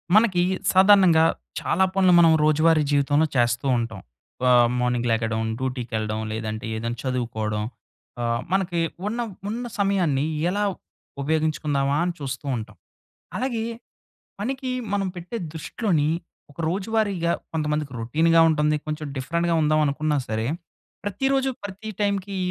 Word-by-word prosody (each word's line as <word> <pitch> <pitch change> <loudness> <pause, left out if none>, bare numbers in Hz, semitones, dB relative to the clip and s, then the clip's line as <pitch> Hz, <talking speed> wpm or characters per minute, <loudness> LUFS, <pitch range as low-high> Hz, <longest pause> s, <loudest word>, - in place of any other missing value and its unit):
మనకీ 195 -6 +4 0.3
సాధారణంగా 190 -4 +6 0.4
చాలా 190 +3 +2
పనులు 185 -2 +4
మనం 165 -1 +7
రోజువారీ 155 +1 +4
జీవితంలో 145 +2 +3
చేస్తూ 120 +1 +2
ఉంటాం. 115 -4 -3 0.5
ఆహ్, 120 -1 +6
మార్నింగ్ 125 -1 0
లెగడం, 110 0 0 0.2
డ్యూటీకె‌ళ్ళ‌డం, 115 -4 -2
లేదంటే 110 +1 -4
ఏదన్నా 115 +2 -3
చదువుకోడం. 110 -5 -2 0.6
ఆహ్, 115 0 0
మనకి 185 -3 +1 0.3
ఉన్న, 230 +3 -3 0.3
ఉన్న 235 +3 -3
సమయాన్ని 180 -9 +2 0.2
ఎలా 205 +3 0 0.6
ఉపయోగించుకుందామా 150 -2 0
అని 180 - -1
చూస్తూ 140 0 -5
ఉంటాం. 105 -2 -8 0.6
అలాగే, 240 -3 -1 0.8
పనికి 260 +4 -3 0.2
మనం 200 -1 0
పెట్టే 175 +6 -6 0.2
దృష్టిలోని, 160 -2 0 0.4
ఒక - - -30
రోజువారీగా 195 -2 0 0.2
కొంతమందికి 150 -3 -1
రొ‌టీన్‌గా 165 +8 +3
ఉంటంది. 150 -1 +2
కొంచం 155 0 -4
డిఫరెంట్‌గా 170 +5 0
ఉందావనుకున్నా 150 0 +1
సరే, 110 +1 -1 0.6
ప్రతిరోజు, 270 +7 0
ప్రతి 205 +2 -6
టైమ్‌కీ 200 -1 -1
155 Hz, 115 wpm, -24 LUFS, 125-190 Hz, 0.8 s, మనం